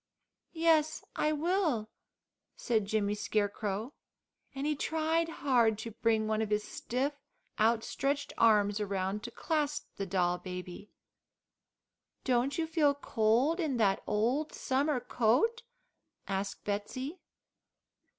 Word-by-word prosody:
"Yes, 320 -2 +3
I 305 - +1
will," 310 - 0 0.6
said 220 -4 0
Jimmy 205 -1 +1
Scarecrow, 210 +2 -2 0.6
and 270 +1 -3
he 300 0 +1
tried 320 +2 0
hard 245 -9 +2
to 225 +2 -6
bring 220 0 +1
one 215 0 0
of 220 - -1
his 210 0 +1
stiff, 260 +6 -2 0.5
outstretched 275 +6 +1
arms 210 -2 +4
around 195 0 -2
to 240 - -6
clasp 300 +3 -1
the 195 - -3
doll 180 -1 +1
baby. 180 +2 -7 1.3
"Don't 255 +2 +1
you 330 - +1
feel 310 -3 +2
cold 250 +4 +2
in 300 -7 0
that 200 -4 +2
old 240 +9 0
summer 275 +1 0
coat?" 250 - +2 0.7
asked 195 0 -3
Betsey. 255 - -4
235 Hz, 115 wpm, -31 LUFS, 210-295 Hz, 1.3 s, arms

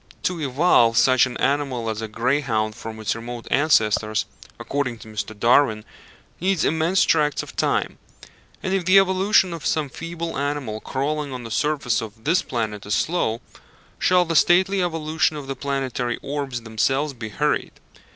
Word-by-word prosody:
To 180 -3 -1
evolve 130 -5 +3
such 130 +1 +5
an 125 - -7
animal 135 -5 0
as 110 0 -3
a 110 - -4
greyhound 115 -1 0
from 110 -1 -8
its 110 0 -1
remote 120 +1 -7
ancestors, 110 -7 +2 0.3
according 135 -4 -2
to 110 - -13
Mr. 110 0 -6
Darwin, 115 -3 +3 0.5
needs 185 -1 +1
immense 165 +4 +2
tracts 150 -2 +2
of - - -12
time; - - 0 0.6
and 185 - -1
if 195 -2 +1
the 185 +2 +6
evolution 190 -1 +3
of 165 - -7
some 155 -3 0
feeble 165 +2 -5
animal 140 -6 -3
crawling 145 +4 -3
on 125 -1 -6
the 115 - -8
surface 145 -6 0
of 110 0 -9
this 165 +4 +2
planet 110 -4 -3
is 105 - +1
slow, 120 -9 0 0.6
shall 180 -1 +3
the 165 0 -2
stately 185 +4 +4
evolution 160 -2 0
of 145 - -7
the 135 0 -4
planetary 135 -4 -2
orbs 135 -4 -4
themselves 135 +6 0
be 115 -3 -7
hurried? 105 - -1
135 Hz, 160 wpm, -22 LUFS, 115-160 Hz, 0.6 s, the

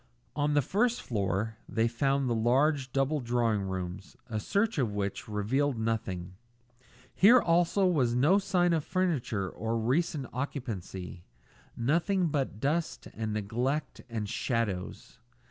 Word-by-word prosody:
On 145 0 +1
the 145 - +4
first 235 - +1
floor 105 0 -2
they 115 0 +2
found 135 +3 +1
the 120 - +1
large 130 +4 +2
double 135 +3 +1
drawing 120 -4 +1
rooms, 95 0 -5
a 110 -3 -3
search 200 - 0
of 110 -6 0
which 100 -1 -3
revealed 120 +6 0
nothing. 95 -5 -3 0.8
Here 235 +6 +7
also 175 +1 +2
was 135 -10 +2
no 155 +11 +4
sign 175 -3 +2
of 160 -3 +1
furniture 155 - -1
or 115 +5 -3
recent 140 +5 0
occupancy; 105 - -5 0.5
nothing 170 - +1
but 135 -8 -2
dust 155 +6 -1
and 110 -1 -3
neglect 120 +8 -2
and 110 -3 -3
shadows. 105 -4 -3
125 Hz, 130 wpm, -30 LUFS, 110-155 Hz, 0.8 s, Here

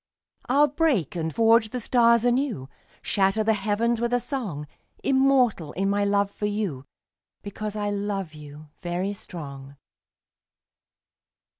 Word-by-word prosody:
I'll 285 +4 +5
break 285 - 0
and 160 -1 -2
forge 225 +2 +4
the 250 - -4
stars 235 0 +4
anew, 245 - 0 0.4
Shatter 195 +2 +2
the 220 +1 +3
heavens 220 +3 0
with 235 +1 +1
a - - +2
song; 215 - -4 0.4
Immortal 265 - +2
in 195 +2 0
my 205 0 +1
love 200 0 +1
for 210 - -3
you, 200 -11 -3 0.6
Because 210 +1 -5
I 205 -1 -1
love 200 -4 -3
you, 150 0 -12
very 180 +3 -2
strong. 140 -7 -9
205 Hz, 130 wpm, -25 LUFS, 175-235 Hz, 0.6 s, I'll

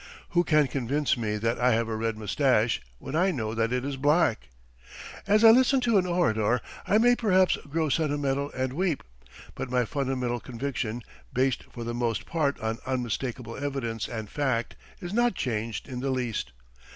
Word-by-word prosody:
Who 175 0 +3
can 150 -3 +4
convince 140 +2 0
me 105 -3 -2
that 115 +2 -1
I 125 0 +4
have 115 0 +1
a 115 - -2
red 110 0 -2
moustache 115 +1 +1 0.2
when 135 - -6
I 180 +4 +3
know 110 -10 -2
that 115 0 0
it 125 +1 -1
is 140 -1 -3
black? 145 - +2 0.8
As 210 +2 +4
I 225 - +10
listen 260 +3 +5
to 230 -5 +3
an 180 - -1
orator 125 -10 +2 0.3
I 210 - +4
may 245 +2 +5
perhaps 190 -6 +3
grow 160 +2 0
sentimental 145 -2 0
and 130 0 -2
weep, 170 -1 -1 0.5
but - - -5
my 125 -1 +1
fundamental 125 -2 -2
conviction, 120 -2 -4 0.3
based 130 0 +1
for 120 - -7
the 120 0 -3
most 120 -2 -1
part 150 -4 0
on 110 +1 -2
unmistakable 125 -1 -3
evidence 135 -6 -3
and 110 -3 -5
fact, 125 -2 -1 0.3
is 175 +1 -5
not 240 -2 +2
changed 115 - -3
in 130 -3 -5
the 135 +2 -2
least. 125 -4 -2
130 Hz, 175 wpm, -27 LUFS, 115-155 Hz, 0.8 s, I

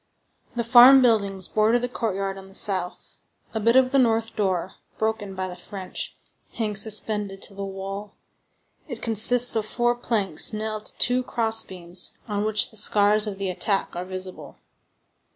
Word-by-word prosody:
The 235 - -1
farm 250 +3 +8
buildings 200 -5 +2
border 220 +2 +2
the 245 +1 -2
courtyard 195 -5 -3
on 195 0 -12
the 195 - -15
south. 185 -4 -1 0.4
A 220 - -2
bit 230 +3 +2
of 260 -1 +4
the 275 - +3
north 225 -2 +1
door, 190 -3 -1 0.3
broken 220 -3 -3
by 185 0 -3
the 180 - -8
French, 185 +1 -7 0.4
hangs 210 -3 -1
suspended 210 -2 -1
to - - -4
the 200 0 -7
wall. 195 +1 -7 0.7
It 245 -6 -8
consists 235 +2 +4
of 220 - 0
four 240 +3 0
planks 215 -8 0
nailed 215 0 -4
to - - -12
two 250 +1 +3
cross 225 -3 +1
beams, 180 -1 -5
on 205 -1 -2
which 215 -1 +1
the 220 - -8
scars 210 +1 +2
of 200 -2 -5
the 195 -1 -3
attack 195 +2 -1
are 175 +1 -5
visible. 185 0 -8
210 Hz, 170 wpm, -24 LUFS, 195-230 Hz, 0.7 s, farm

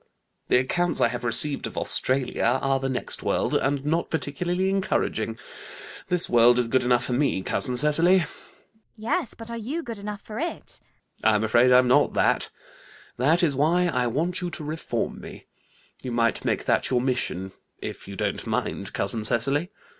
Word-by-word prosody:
The - - +4
accounts 175 +8 0
I - - +3
have 120 0 -5
received 120 +5 +4
of - - -11
Australia 130 -1 0
and 135 -1 +1
the 135 - -2
next 130 - -2
world, - - -1
are 135 - +2
not 145 +4 -1
particularly 175 +4 -1
encouraging. 150 - -1 0.7
This 180 -1 +3
world 120 +1 +5
is 125 -1 +1
good 130 +2 +1
enough 125 0 +2
for 125 - -3
me, 125 -7 0
cousin 125 +7 -1
Cecily. 165 +7 +5
CECILY. 155 - -6 0.6
Yes, 235 +7 -2
but 230 0 -9
are 235 - -4
you 285 +10 -4
good 230 -5 -7
enough 205 0 -6
for 215 +1 -8
it? 340 +3 -5 0.4
ALGERNON. 110 0 +4
I'm 105 - 0
afraid 120 +3 +4
I'm 125 0 +5
not 125 - +3
that. - - +1 0.7
That 155 +8 +2
is 150 -5 +2
why 170 +6 +2
I 125 -5 0
want 170 +9 -2
you 175 - -3
to 155 - -8
reform 150 -6 -4
me. - - -11 0.6
You 125 - -5
might 115 -1 0
make - - -1
that - - +1
your 125 - +2
mission, 125 -7 -2 0.3
if - - -7
you - - -8
don't - - -3
mind, - - -3
cousin 105 +3 -1
Cecily. 135 +10 +1
135 Hz, 180 wpm, -25 LUFS, 120-175 Hz, 0.7 s, world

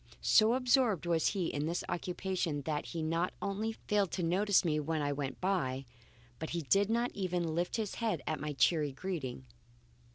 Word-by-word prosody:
So 225 +2 +5
absorbed 250 - +2
was 165 -2 +2
he 190 -5 -1
in 145 +1 -1
this 170 +2 -1
occupation 175 -4 -2
that 150 0 -2
he 165 -2 -4
not 165 +3 0
only 215 +3 -2
failed 205 -3 0
to 180 - -1
notice 190 +3 +3
me 155 -2 +1
when 155 +1 -1
I 145 -1 0
went 140 -2 -4
by, 135 -9 0 0.5
but 160 - -4
he 170 -1 -2
did 200 +7 +3
not 235 +2 +1
even 180 -4 -1
lift 175 +2 -1
his 215 -3 -2
head 215 -11 0
at 155 - -2
my 150 0 -3
cheery 150 0 +2
greeting. 135 -6 -4
175 Hz, 185 wpm, -33 LUFS, 150-200 Hz, 0.5 s, So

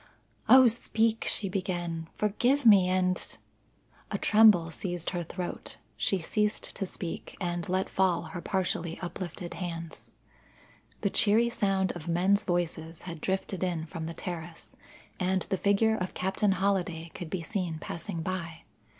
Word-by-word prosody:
"O 260 -1 +9
speak!" 225 -1 +1
she 200 - -2
began. 175 -4 -3
"Forgive 245 +7 +1
me, 195 -5 +7
and 185 0 0 0.4
" - - -32
A - - 0
tremble 210 -7 +5
seized 175 -1 -3
her 175 -2 -2
throat; 175 +2 -6 0.2
she 195 - +1
ceased 210 +5 -1
to 195 - -2
speak 175 -2 -6
and 175 -2 -2
let 185 +1 +1
fall 185 -3 +1
her 175 - -7
partially 175 -4 -1
uplifted 175 -1 -5
hands. 165 -2 -6 0.9
The 200 - +1
cheery 225 +3 +4
sound 195 -4 +1
of 175 -2 -9
men's 185 +4 +3
voices 165 -2 -2
had 170 -4 -7
drifted 190 0 -2
in 170 -3 -1
from 160 0 -6
the 165 - -6
terrace, 170 -2 -7 0.4
and 185 0 +1
the 190 - -2
figure 220 +2 +3
of 180 -1 -4
Captain 190 +2 +1
Holliday 180 -4 -1
could 175 - -7
be 180 -1 -3
seen 175 -3 -2
passing 165 +1 -5
by. 170 -3 -4
185 Hz, 150 wpm, -29 LUFS, 170-200 Hz, 0.9 s, O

